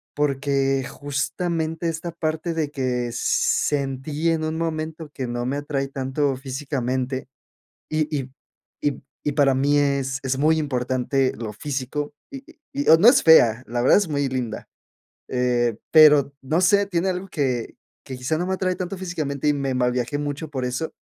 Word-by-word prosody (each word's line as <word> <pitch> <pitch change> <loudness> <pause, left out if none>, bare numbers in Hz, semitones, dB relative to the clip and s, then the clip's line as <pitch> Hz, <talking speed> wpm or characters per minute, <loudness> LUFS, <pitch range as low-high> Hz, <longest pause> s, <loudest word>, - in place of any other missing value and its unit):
porque 135 -2 +1
justamente 160 +3 -2
esta 165 +1 -4
parte 160 0 -2
de 155 -3 -1
que 125 -3 -1
sentí 145 +3 0
en 160 -1 0
un 160 +1 -2
momento 160 -1 -3
que 130 -3 -4
no 120 0 -3
me 135 +3 -1
atrae 140 -1 -2
tanto 135 +1 -1
físicamente, 130 -1 -3 0.6
y 155 -1 0
y 130 -1 -4 0.5
y 145 -3 -1 0.2
y 145 - 0
para 140 -2 +3
mí 145 +2 +2
es 135 -2 0
es 130 0 0
muy 160 +2 +3
importante 130 -1 0
lo 110 -2 -5
físico, 145 +3 -4 0.2
y 275 0 -8 0.3
y, 285 +1 -2
o 160 - +10
no 210 - +7
es 250 - +6
fea, 125 -7 +6
la 120 +1 -2
verdad 130 - +6
es 200 - -1
muy 145 -2 0
linda, 125 -4 -4 0.6
eh, 120 -3 +1
pero 150 -3 +7
no 155 +6 0
sé, 200 +2 +4
tiene 180 0 0
algo 185 +1 -3
que 130 -8 -2 0.3
que 130 - -7
quizá, 135 +5 -1
no 175 - -1
me 190 - 0
atrae 185 -1 -1
tanto 185 +1 -4
físicamente. 155 -6 -3
Y 150 - +4
me 135 -2 -2
mal 125 -1 +2
viajé 125 +3 -1
mucho 145 +1 -4
por 130 -3 -3
eso, 130 +6 -3
145 Hz, 170 wpm, -23 LUFS, 130-160 Hz, 0.6 s, o